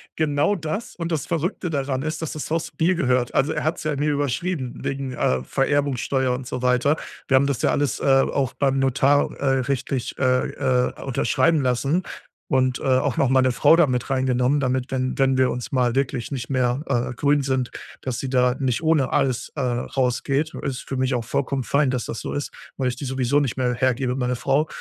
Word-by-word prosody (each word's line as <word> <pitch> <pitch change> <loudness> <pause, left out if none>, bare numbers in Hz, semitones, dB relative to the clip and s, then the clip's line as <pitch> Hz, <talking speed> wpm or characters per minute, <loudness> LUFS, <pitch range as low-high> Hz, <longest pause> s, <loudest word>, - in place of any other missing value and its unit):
Genau 150 +5 +1
das 160 +6 -4
und 170 -1 -4
das 150 -5 -1
Verrückte 170 +2 -2
daran 135 -3 -1
ist, 155 +2 -3
dass 160 - -3
das 155 - -5
Haus 165 0 -1
mir 175 +3 +3
gehört. 125 -5 +1
Also 140 +4 +2
er - - -2
hat 160 +3 0
es - - -7
ja 155 -1 -1
mir 150 +2 0
überschrieben 145 0 -2
wegen, 135 -1 -3
äh, 65 - 0
Vererbungssteuer 135 - 0
und 125 0 -5
so 125 - -4
weiter. 125 +4 +2 0.3
Wir 135 - +3
haben 135 +1 +4
das 140 -4 -1
ja - - +2
alles, 145 -3 0
äh, - - -7
auch 135 -1 +2
beim 135 -1 +1
Notar, 135 +2 +3
äh, - - -4 0.2
rechtlich, 130 -1 -2
äh, 130 -1 +2
äh, 130 -2 0
unterschreiben 140 +4 +1
lassen 135 +7 +1 0.4
und, 130 -1 +1
äh, - - -9
auch 130 0 +2
noch 135 - +3
meine 130 -1 +4
Frau 160 - +5
da 170 -4 +5
mit 125 0 -2
reingenommen, 130 +1 +1
damit, 130 -1 -1
wenn 130 -1 -1
wenn 135 -1 +3
wir 130 -1 +3
uns 125 +5 -5
mal 125 -3 +1
wirklich 135 -2 -1
nicht 125 -2 -4
mehr, 130 +1 0
äh, 125 -1 0
grün 145 +2 +2
sind, 130 -2 -1 0.3
dass 130 -2 -3
sie 135 - -4
da 125 -1 +2
nicht 130 0 0
ohne 155 -5 +2
alles, 125 -1 0
äh, 140 - -2
rausgeht. 130 +4 -1
Ist 130 -2 -3
für 135 - -3
mich 130 0 +1
auch 120 -2 -1
vollkommen 135 +1 -1
fein, 140 +3 +2
dass 125 -2 -2
das 115 - -5
so - - -5
ist, 145 - -3 0.3
weil 130 -2 0
ich 125 - -5
die 140 - -5
sowieso 130 +2 +1
nicht 135 -5 -1
mehr 125 -1 +1
hergebe, 130 0 0
meine 125 -1 -1
Frau. 140 +5 +1
135 Hz, 215 wpm, -23 LUFS, 125-145 Hz, 0.4 s, Frau